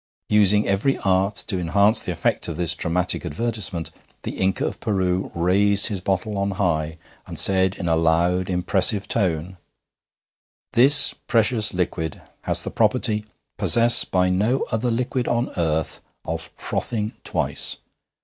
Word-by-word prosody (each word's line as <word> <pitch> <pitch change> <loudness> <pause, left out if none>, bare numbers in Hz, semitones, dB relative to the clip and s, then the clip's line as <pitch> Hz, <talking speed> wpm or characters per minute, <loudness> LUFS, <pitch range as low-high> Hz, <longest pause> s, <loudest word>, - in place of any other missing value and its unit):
Using 105 0 +4
every 100 +8 +1
art 95 +2 +2
to 95 -4 -3
enhance 100 +5 +3
the - - -4
effect - - -1
of - - -5
this 85 -2 +1
dramatic 90 +2 -1
advertisement, 95 -3 -3 0.3
the - - -4
Inca 95 0 -1
of - - -4
Peru 95 -3 -1
raised 100 +5 +2
his 100 -4 -4
bottle 100 +2 -1
on 100 0 0
high, 80 -5 0 0.3
and - - -8
said 95 0 +3
in 90 - -4
a 80 - +3
loud, 85 +3 +1
impressive 95 +3 +1
tone: 90 -4 -1 1.2
'This 135 +5 +6
precious 115 -1 +2
liquid 85 -3 -2 0.3
has - - +1
the - - -5
property, 105 -1 0 0.3
possessed 115 0 +3
by 90 0 +2
no 110 +8 +1
other 110 +2 0
liquid 125 +1 -1
on 120 +1 0
earth, 80 -2 -1 0.2
of 80 0 -5
frothing 110 -2 -3
twice. - - -3
95 Hz, 140 wpm, -22 LUFS, 90-110 Hz, 1.2 s, This